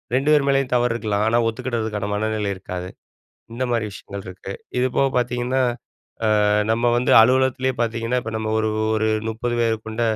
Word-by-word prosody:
2 135 +3 +1
பேர் 145 -2 +4
மேலயும் 135 -2 +1
தவறு 120 -1 +2
இருக்கலாம். 105 -2 -1
ஆனா 115 +1 +3
ஒத்துக்கிடறதுக்கான 110 -3 -3
மனநிலை 105 -1 -1
இருக்காது. 90 -1 -6 0.6
இந்த 125 +2 -2
மாதிரி 115 -2 0
விஷயங்கள் 100 0 -9
இருக்கு. 95 +1 -8 0.3
இது 125 - +3
போக 135 - +4
பார்த்தீங்கன்னா, 125 +1 0 0.8
அ - - +3 0.3
நம்ம 120 +1 +2
வந்து 125 - 0
அலுவலகத்திலேயே 130 +2 +2
பார்த்தீங்கன்னா, 115 +1 -1
இப்போ 115 - -6
நம்ம 110 0 -2
ஒரு 110 - 0 0.3
ஒரு 110 0 +1 0.2
30 120 +2 -3
பேர் 115 -1 +1
கொண்ட 110 +2 -3
115 Hz, 165 wpm, -22 LUFS, 110-125 Hz, 0.8 s, பேர்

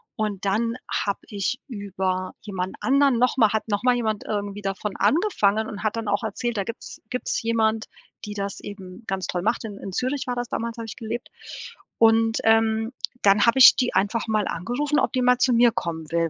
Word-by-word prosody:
Und 205 -3 -3
dann 230 +4 0
habe 200 -1 -1
ich 205 +5 -2
über 190 -4 -3
jemand 190 -3 -4
anderen 275 -2 +3
nochmal 250 -2 +3
hat 220 - -1
nochmal 245 +4 +2
jemand 220 -3 -1
irgendwie 205 -1 -3
davon 195 +1 -3
angefangen 220 - +2
und 205 - -7
hat 215 +1 -1
dann 225 -1 -4
auch 205 0 +1
erzählt, 230 +2 -3
da 200 - 0
gibt's 230 +4 -8
gibt's 250 0 -2
jemand, 225 -1 +1 0.4
die 210 - -6
das 200 -1 -4
eben 195 +1 -10
ganz 190 -1 -2
toll 180 - -2
macht. 220 +6 0
In 205 -2 -7
in 195 - -7
Zürich 260 +7 -2
war 245 - -1
das 245 -1 -4
damals 230 0 -3
habe 230 - -5
ich 225 - -7
gelebt. 230 +1 -5 0.7
Und, 225 0 +4
ähm, 225 0 +3 0.3
dann 200 +1 +5
habe 235 +3 +3
ich 250 - +10
die 250 - 0
einfach 220 +4 0
mal 215 -2 +1
angerufen, 260 - -1
ob - - 0
die 255 - +1
mal 250 0 +4
zu 250 0 +3
mir 235 0 +5
kommen 160 -5 -4
will. 165 -1 +1
220 Hz, 200 wpm, -24 LUFS, 200-240 Hz, 0.7 s, ich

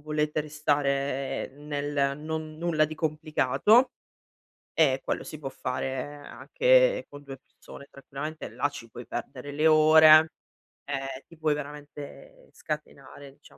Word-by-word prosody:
volete 150 0 -1
restare 140 -2 -1
nel 145 -1 -2
non 155 0 -5
nulla 165 -2 +2
di 155 - -5
complicato, 155 - +2 0.8
e 135 -5 +3
quello - - -2
si 155 - -9
può 135 -2 -6
fare 130 0 -3
anche - - +2
con 145 0 -12
2 135 -1 -9
persone 140 +1 -15
tranquillamente, 145 +3 -7
là 145 - -1
ci 115 -5 -10
puoi - - -10
perdere 145 - -6
le 150 +2 +1
ore, 155 0 +7 0.5
e 135 -1 -5
ti 165 - -17
puoi 155 -1 +1
veramente 150 - -10
scatenare, 140 -2 -8
diciam 145 - -21
150 Hz, 130 wpm, -27 LUFS, 140-155 Hz, 0.8 s, ore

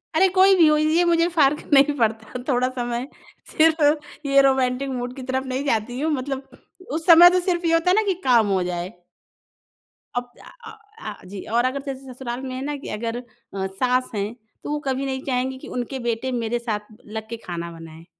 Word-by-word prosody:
अरे! 380 +4 +5
कोई 385 +1 +6
भी 335 -3 +6
हो 305 0 +4
ये 310 +3 +3
मुझे 335 0 +3
फ़र्क 295 -1 +3
नहीं 280 +1 +6
पड़ता 225 +1 -1
थोड़ा 255 -1 +2
समय 245 0 -3 0.4
सिर्फ़ 300 -2 +2
ये 275 0 +5
रोमांटिक 265 0 +1
मूड 250 0 -4
की 260 - -8
तरफ़ 260 +1 -2
नहीं 260 +2 -2
जाती 240 0 -1
हूँ। 315 +2 0
मतलब 270 -1 -4 0.3
उस 320 +2 -3
समय 345 0 +9
तो 365 0 +2
सिर्फ़ 350 -1 -1
ये 330 - +2
होता 330 +2 +3
है 370 - +4
ना 435 - +4
कि 385 - +3
काम 235 -5 +4
हो 190 -2 +1
जाए। 180 +1 -4 1.2
अब 245 0 -3
अ - - -15 0.2
अ, 440 - -15 0.2
आ 215 - -5
जी 195 +1 -8 0.2
और 240 - +3
अगर 275 +2 -1
जैसे 265 -1 -7
ससुराल 245 0 -5
में 260 -1 -5
है 260 - -5
ना 295 0 -2
कि 280 - -9
अगर 230 +1 -3
अ, 250 - -7 0.4
सास 250 +6 0
हैं 205 +3 -2 0.3
तो - - -6
वो 300 - -1
कभी 265 +1 -1
नहीं 265 -1 -3
चाहेंगी 260 0 -1
कि - - -11
उनके 260 +2 -4
बेटे 235 +3 -2
मेरे 240 -1 -1
साथ 215 -3 -4
लग 220 0 -7
के 230 - -5
खाना 170 -1 -5
बनाएँ। 165 0 -12
260 Hz, 210 wpm, -23 LUFS, 235-295 Hz, 1.2 s, समय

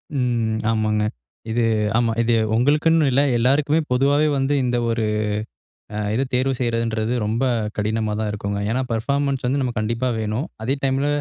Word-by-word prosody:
ம். 120 -4 0
ஆமாங்க, 110 -1 +1 0.5
இது 120 +1 +1 0.3
ஆமா 120 -1 +2
இது 120 0 +2 0.2
உங்களுக்குன்னு 150 +5 +3
இல்ல, 135 +3 +3 0.2
எல்லாருக்குமே 140 +6 +2
பொதுவாவே 140 +4 +3
வந்து 135 +1 +1
இந்த 120 0 0
ஒரு 115 -1 0 0.9
அ - - -3 0.2
இது 130 +4 +1
தேர்வு 130 +2 +2
செய்கிறதுன்றது 115 -2 -1
ரொம்ப 115 +5 0 0.3
கடினமாதா 110 0 -1
இருக்குங்க. 100 0 -3
ஏன்னா 125 +3 0
பர்ஃபார்மன்ஸ் 140 +3 -1
வந்து 135 +3 +1
நமக்கு 125 -4 -2
கண்டிப்பா 115 +4 -1
வேணும். 110 +6 -2 0.2
அதே 130 +5 0
டைமில, 135 +1 +1
120 Hz, 145 wpm, -22 LUFS, 110-135 Hz, 0.9 s, உங்களுக்குன்னு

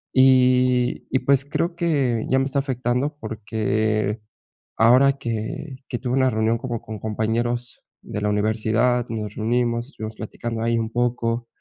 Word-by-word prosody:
Y 125 -1 +4
y 130 - +1
pues, 135 +1 +3
creo 170 +4 -1
que 140 -10 +1
ya 130 - +3
me 135 - +2
está 140 0 0
afectando 130 +2 -1
porque 110 -1 -1 0.5
ahora 130 +5 +5
que 120 +3 -5
que 120 - -4
tuve 125 -1 -2
una 130 -1 +3
reunión 110 0 +1
como 120 -2 -4
con 110 -1 -8
compañeros 115 +3 -2 0.2
de - - -5
la 105 - +1
universidad, 110 +4 +1
nos 105 -2 -4
reunimos, 120 +1 0
estuvimos 110 -6 -7
platicando 115 +1 -5
ahí 115 +1 +1
un 115 0 -2
poco 120 0 -1
120 Hz, 150 wpm, -23 LUFS, 110-130 Hz, 0.5 s, ahora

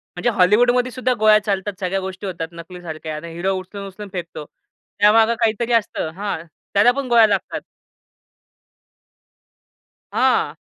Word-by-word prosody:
म्हणजे 180 +7 0
हॉलीवूडमध्ये 240 +5 +3
सुद्धा 255 0 0
गोळ्या 215 0 +6
चालतात 200 -1 -2
सगळ्या 195 0 -1
गोष्टी 190 +1 -6
होतात, 165 -3 -4
नकलीसारख्या 170 -2 -8
आणि 165 +2 -8
हिरो 185 +3 -1
उचलून-उचलून 200 +1 -9
फेकतो. 170 -4 -6 0.5
त्यामागे 225 +2 +5
काहीतरी 230 +1 +1
असतं 210 -7 0
हां, 200 -4 -4 0.3
त्याला 205 +5 +5
पण 275 +1 -4
गोळ्या 230 -2 +6
लागतात. 205 - -2 2.5
हां. - - +2
200 Hz, 125 wpm, -20 LUFS, 180-225 Hz, 2.5 s, गोळ्या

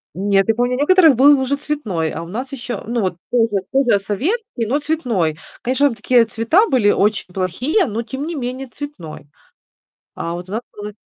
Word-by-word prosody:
Нет, 195 +1 +2
я 225 - +3
помню, 245 +2 0
у - - -4
некоторых 320 -1 +5
был 280 +3 +6
уже 265 +1 0
цветной. 220 - -2
А - - -5
у - - -9
нас 245 +9 -5
еще 245 -5 -5
ну, 235 0 -1
вот 185 -3 -2
тоже 225 -5 +1
тоже 255 -6 +3
советский, 270 - -2
но 265 +7 0
цветной. 240 - -1 0.2
Конечно, 260 +3 +2
там 250 - -3
такие 240 0 +3
цвета 230 - +2
были 245 -7 +3
очень 205 -2 +1
плохие, 245 - 0
но, 225 -2 -3
тем 265 +5 -5
не 335 +1 -4
менее, 260 0 -4
цветной. 280 - -8 0.9
А 165 - -4
вот 175 +1 -7
у - - -9
нас 225 +3 -2
был 210 0 -7
240 Hz, 195 wpm, -19 LUFS, 205-280 Hz, 0.9 s, был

